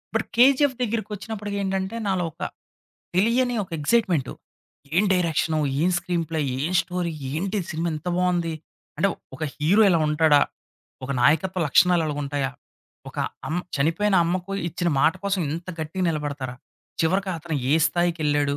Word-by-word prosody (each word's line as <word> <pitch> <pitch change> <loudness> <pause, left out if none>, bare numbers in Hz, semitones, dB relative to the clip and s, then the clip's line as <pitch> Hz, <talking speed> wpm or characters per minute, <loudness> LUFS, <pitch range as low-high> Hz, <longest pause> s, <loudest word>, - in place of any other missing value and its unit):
But - - +1
'KGF' 265 +1 +5
దగ్గరికొచ్చినప్పటికెంటంటే, 205 -2 -3
నాలో 190 -2 +1
ఒక - - -19 0.7
తెలియని 240 +5 +2
ఒక 180 - -15
ఎగ్జైట్‌మెంటు, 180 - +1 0.6
ఏం 200 - +5
డైరెక్షను, 160 -3 +1 0.2
ఏం 180 - +3
స్క్రీన్‌ 175 -1 -2
ప్లే‌, 160 - 0 0.2
ఏం 180 - -2
స్టోరీ! 180 -2 -3 0.2
ఏంటి 190 +7 -2
ఇది 170 - -9
సినిమా 165 +2 -1
ఇంత 155 +3 -7
బావుంది. 175 -2 +1 0.4
అంటే 200 - +3 0.3
ఒక 155 - -5
హీరో 180 +9 +3
ఇలా 170 -3 +3
ఉంటాడా, 150 -1 +5 0.7
ఒక 130 - -6
నాయకత్వ 165 +8 +3
లక్షణాలు 175 +3 +4
ఇలగా 145 -1 -3
ఉంటాయా, 140 -1 -1 0.6
ఒక - - -9 0.3
అమ్ 165 +3 -1 0.2
చనిపోయిన 165 +8 +1
అమ్మకు 180 +3 -2 0.2
ఇచ్చిన 175 +1 -1
మాట 160 - +5
కోసం 200 -2 0
ఇంత 170 +3 -6
గట్టిగా 165 +4 -3
నిలబడతారా, 145 -5 -3 0.5
చివరికి 190 +4 +1
అతను 160 -1 -4
ఏ 150 - +5
స్థాయికెళ్ళాడు, 155 -4 +1
175 Hz, 140 wpm, -24 LUFS, 155-195 Hz, 0.7 s, KGF